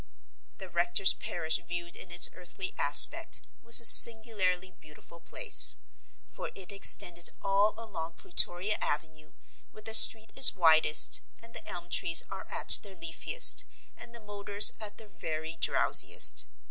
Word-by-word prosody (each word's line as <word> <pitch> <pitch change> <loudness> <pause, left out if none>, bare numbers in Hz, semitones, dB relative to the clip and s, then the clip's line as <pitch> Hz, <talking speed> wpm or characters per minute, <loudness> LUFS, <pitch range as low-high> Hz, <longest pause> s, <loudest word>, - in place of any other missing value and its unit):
The 190 - -14
rector's 175 +2 -2
parish 160 0 -8
viewed 175 0 -12
in - - -17
its 175 0 +2
earthly 380 - -11
aspect, - - +2 0.2
was 235 +1 +3
a 235 - -5
singularly 205 -6 +3
beautiful 155 +1 -21
place. 455 - +3 0.5
For - - -13
it 190 -1 -12
extended 175 -3 0
all 200 +2 -3
along 170 -8 -12
Plutoria 175 +5 -4
Avenue, 155 0 -10 0.4
where 215 - -18
the 220 +1 -9
street 220 0 +4
is 265 - +6
widest 160 -4 0 0.2
and 230 0 -21
the - - -13
elm 175 0 -10
trees 165 0 +1
are 195 - -13
at - - 0
their 200 -2 -17
leafiest 165 - -2 0.3
and 235 - -18
the - - -15
motors 205 -1 -3
at 210 -2 -14
their 220 - -16
very 160 -3 -11
drowsiest. - - +1
190 Hz, 145 wpm, -25 LUFS, 170-215 Hz, 0.5 s, is